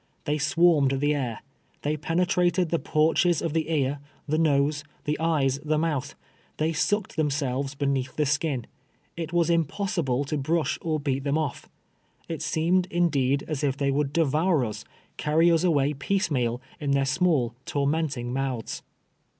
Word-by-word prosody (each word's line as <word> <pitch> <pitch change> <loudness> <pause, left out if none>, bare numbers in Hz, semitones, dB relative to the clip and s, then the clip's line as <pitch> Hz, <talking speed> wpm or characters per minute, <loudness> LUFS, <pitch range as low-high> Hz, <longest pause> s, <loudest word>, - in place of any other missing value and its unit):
They 150 +1 -1
swarmed 155 -2 +3
the 145 +1 +2
air. 125 -7 -3 0.4
They 150 +1 0
penetrated 175 +2 +1
the 170 - +1
porches 160 +2 +2
of 165 - -2
the 160 -1 -1
ear, 145 -3 0 0.3
the 155 +2 +1
nose, 145 -1 +2 0.2
the 150 - 0
eyes, 145 -5 +1
the 155 0 +1
mouth. 150 -4 -1 0.4
They 160 +1 0
sucked 205 +5 0
themselves 140 -2 -1
beneath 135 -2 -1
the 150 - +1
skin. 145 -3 0 0.5
It 165 -1 -5
was 170 -1 +2
impossible 165 -5 0
to 150 +1 -2
brush 155 +3 0
or 155 -2 -1
beat 135 -2 -1
them 140 +1 +1
off. 155 -3 -3 0.6
It 165 - -4
seemed, 175 +3 +1
indeed, 140 -6 +1
as 155 -3 -3
if 140 -2 0
they 140 -1 +1
would 140 0 0
devour 160 -1 +2
us 110 -1 -6 0.2
— - - -37
carry 160 +3 +3
us 165 0 +3
away 150 -5 +2
piecemeal, 140 - -1 0.2
in 140 -2 0
their 140 -1 +2
small 135 -5 +1
tormenting 140 -4 -1
mouths. 130 -4 -3
150 Hz, 160 wpm, -26 LUFS, 140-165 Hz, 0.6 s, swarmed